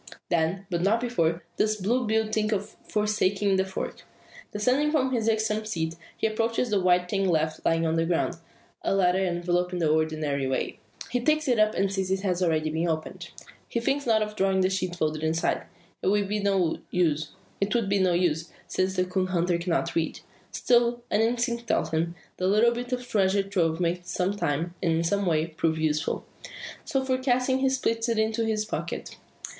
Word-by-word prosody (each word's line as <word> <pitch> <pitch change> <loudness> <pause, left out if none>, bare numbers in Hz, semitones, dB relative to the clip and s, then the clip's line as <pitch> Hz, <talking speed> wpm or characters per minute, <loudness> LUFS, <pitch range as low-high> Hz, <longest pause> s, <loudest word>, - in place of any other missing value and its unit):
Then, 170 +3 0
but 170 -1 0
not 205 +5 +3
before, 175 -9 0
does 215 0 +2
Blue 230 +5 0
Bill 220 0 +2
think 215 0 0
of 205 -1 -1 0.2
forsaking 205 -2 +1
the 190 - +2
fork. 190 - -5 0.5
Descending 250 +8 +2
from 270 -4 +1
his 230 -3 +1
irksome 220 -1 0
seat, 165 -7 -2 0.2
he - - -1
approaches 225 +2 0
the 200 -2 +2
white 180 0 +3
thing 195 +1 0
left 155 -2 0
lying 165 0 +2
on 160 0 +1
the 165 - +2
ground 175 0 0 0.4
a - - 0
letter 185 -1 +3
enveloped 175 0 0
in - - -1
the 165 -2 +1
ordinary 155 -3 0
way. 130 - -2 0.3
He 245 - +1
takes 310 +4 +1
it 245 -4 +2
up, 215 0 +3
and 195 0 +1
sees 190 -1 -1
it 190 0 0
has 185 -3 0
been 180 -2 +2
already 160 +1 0
opened. 160 -1 -4 0.4
He 235 - -1
thinks 275 +3 -1
not 220 -2 +4
of 210 0 -6
drawing 195 -1 +2
out - - +3
the 185 - +3
sheet 185 -2 -2
folded 155 -2 -1
inside. 160 +1 0 0.4
It - - -2
would 205 0 +2
be 210 +1 -1
no 195 -5 +1
use; 155 -4 +1 1.4
since 190 +1 0
the 185 -1 +2
coon 185 0 -1
hunter 175 -1 +1
cannot 170 -1 -1
read. 165 -1 -1 0.3
Still, 240 0 +2
an 210 - +3
instinct 235 0 0
tells - - 0
him, 165 +2 -1 0.2
the 185 - 0
little 215 +4 +4
bit 245 +1 -5
of 250 0 -3
treasure 200 -2 +2
trove 175 -5 0
may 175 0 0
some 180 +2 -1
time, 165 -2 -1
and 170 -3 +2
in 165 +1 +1
some 200 +3 0
way, 160 -2 +2
prove 160 0 -1
useful. 155 0 -1 0.6
So 265 -1 -1
forecasting, 260 0 +1
he 265 0 +3
slips 235 -3 0
it 230 - +1
into 220 +1 +1
his 215 -1 0
pocket. 215 - -5
195 Hz, 190 wpm, -27 LUFS, 170-220 Hz, 1.4 s, not